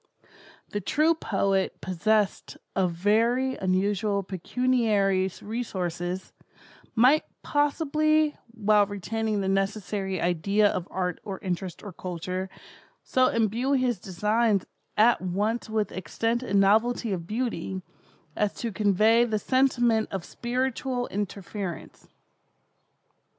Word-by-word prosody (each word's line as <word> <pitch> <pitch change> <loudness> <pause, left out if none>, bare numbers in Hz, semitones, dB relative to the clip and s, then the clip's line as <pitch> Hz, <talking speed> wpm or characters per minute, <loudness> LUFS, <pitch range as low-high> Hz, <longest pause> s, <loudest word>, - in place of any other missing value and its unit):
The 205 - -3
true 305 - +3
poet 195 - 0
possessed 205 +3 0 0.2
of 185 -2 +2
very 230 +9 +2
unusual 200 +2 0
pecuniary 200 -1 +1
resources, 185 -5 -4 0.6
might 255 +7 +5 0.2
possibly, 305 +1 +2
while 210 -3 +3
retaining 210 +1 -2
the 190 - -1
necessary 195 -1 -1
idea 195 +5 +2
of 180 -3 -2
art 180 -2 -2
or 195 -2 -5
interest 180 -1 -4
or 205 -3 -8
culture, 185 +2 -4 0.5
so 255 0 +3
imbue 230 +4 +1
his 255 -6 +1
designs 210 +3 +1 0.3
at 230 +3 +5
once 205 +6 -1
with 215 -1 -1
extent 225 +7 -2
and 200 -6 +1
novelty 220 +3 +3
of 170 -3 -5
Beauty, 210 -5 -3 0.5
as 210 -1 0
to 230 - -3
convey 215 +3 +4
the 220 -3 0
sentiment 240 -2 +2
of 190 -3 -4
spiritual 250 +1 -2
interference. 200 -2 -5
210 Hz, 110 wpm, -27 LUFS, 190-235 Hz, 0.6 s, might